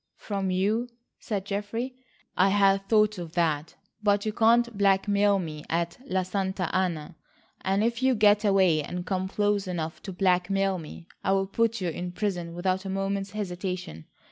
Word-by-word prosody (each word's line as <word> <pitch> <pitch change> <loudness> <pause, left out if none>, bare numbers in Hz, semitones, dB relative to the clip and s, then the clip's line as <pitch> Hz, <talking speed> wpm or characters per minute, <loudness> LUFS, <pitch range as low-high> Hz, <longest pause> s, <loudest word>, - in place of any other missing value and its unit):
"From 195 -2 -3
you?" 205 +6 +1 0.3
said 200 -4 -3
Geoffrey. 210 +5 -3 0.4
"I 190 +2 +4
had 195 0 +3
thought 215 -2 +3
of 165 -2 -7
that, 160 -3 0 0.3
but 205 -1 +2
you 215 - -1
can't 235 +1 +3
blackmail 200 0 +3
me 155 -5 -5
at 170 +3 -1
La 190 -6 0
Santa 190 -1 -2
Anna, 175 -3 -1 0.5
and 195 +2 +1
if 235 +2 0
you 260 -1 +3
get 210 0 +4
away 190 -6 +4
and 175 +4 -5
come 190 -1 -1
close 205 0 0
enough 165 -3 -4
to 195 - -6
blackmail 190 +1 +1
me, 165 +1 -10 0.2
I'll 195 0 +2
put 230 +2 0
you 180 - 0
in 175 +2 -5
prison 175 -4 -3
without 185 +1 0
a 195 - -5
moment's 195 0 -2
hesitation. 180 - -4
195 Hz, 165 wpm, -27 LUFS, 180-205 Hz, 0.5 s, I